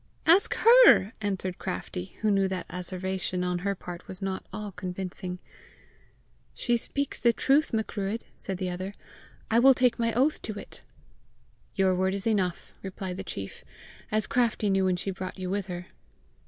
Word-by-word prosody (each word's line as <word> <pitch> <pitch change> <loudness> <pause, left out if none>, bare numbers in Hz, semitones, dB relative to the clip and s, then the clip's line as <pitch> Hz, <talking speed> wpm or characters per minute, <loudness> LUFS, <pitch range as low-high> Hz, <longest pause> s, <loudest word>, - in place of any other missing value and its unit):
"Ask 350 +5 +5
HER," 460 - +7
answered 190 -3 -2
Craftie, 90 0 -5
who 215 - +4
knew 195 -1 +3
that 185 -2 -3
asseveration 180 0 -2
on 180 -1 -1
her 200 +2 -1
part 175 -1 -9
was 185 - -7
not 195 -1 -3
all 210 -1 -5
convincing. 180 0 -5 1.2
"She 240 - +1
speaks 280 +4 -2
the 235 - +5
truth, 275 +6 +2
Macruadh," 220 -1 -2
said 190 - -5
the 185 -1 -2
other. 185 +3 -5 0.6
"I 230 - +5
will 265 +2 +7
take 250 -1 +2
my 230 0 +2
oath 275 +5 +2
to 215 -2 -5
it." - - -9 0.9
"Your 190 -2 +3
word 190 +1 +1
is 200 - -3
enough," 190 -6 0
replied 190 -1 -5
the 190 - -4
chief, 100 - -7 0.2
" - - -21
as 215 -1 +1
Craftie 230 -4 +1
knew 195 0 +3
when 185 -1 +2
she 190 +2 -3
brought 185 0 -6
you 185 -1 -4
with 200 -1 -2
her." 175 -1 -5
195 Hz, 170 wpm, -28 LUFS, 185-220 Hz, 1.2 s, HER